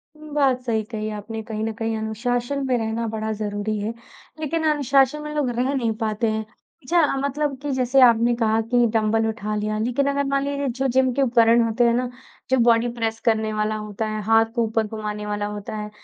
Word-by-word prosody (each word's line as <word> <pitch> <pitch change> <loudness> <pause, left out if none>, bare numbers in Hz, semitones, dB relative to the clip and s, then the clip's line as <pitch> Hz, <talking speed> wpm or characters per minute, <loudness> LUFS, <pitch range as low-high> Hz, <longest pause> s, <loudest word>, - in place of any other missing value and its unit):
उम, 305 0 -12
बात 270 -4 +2
सही 220 -2 0
कही 215 -1 -3
आपने 220 +2 -6
कहीं 220 0 -4
न 225 - -1
कहीं 225 0 -2
अनुशासन 245 +5 -2
में 250 -1 +2
रहना 225 +1 -2
बड़ा 220 0 -3
ज़रूरी 210 0 -3
है, 215 +3 -3 0.5
लेकिन 320 +1 -2
अनुशासन 280 0 +2
में 300 0 -5
लोग 285 -4 +1
रह 250 +3 0
नहीं 235 -4 0
पाते 220 +1 0
हैं। 220 0 -2 0.4
अच्छा, 320 0 +2
मतलब 280 0 -1
कि 290 -1 -3
जैसे 260 +1 +2
आपने 235 -1 +5
कहा 225 -1 +1
कि 240 -1 +4
डंबल 225 0 +2
उठा 215 -1 -3
लिया, 215 0 -1
लेकिन 250 +5 0
अगर 280 0 0
मान 275 0 +1
लीजिए 280 0 -2
जो 265 +3 -1
जिम 260 0 +2
के 275 - 0
उपकरण 235 -2 +4
होते 230 +2 +1
हैं 235 0 +4
ना, 250 +1 0 0.4
जो 260 - +3
बॉडी 230 +1 +4
प्रेस 225 0 -1
करने 220 -1 +1
वाला 215 0 0
होता 210 0 -4
है, 215 0 -3
हाथ 225 +1 +4
को 235 - +2
ऊपर 220 -1 0
घुमाने 210 -1 -5
वाला 205 0 -2
होता 210 +1 -6
है। 210 0 -5
230 Hz, 215 wpm, -23 LUFS, 215-260 Hz, 0.5 s, आपने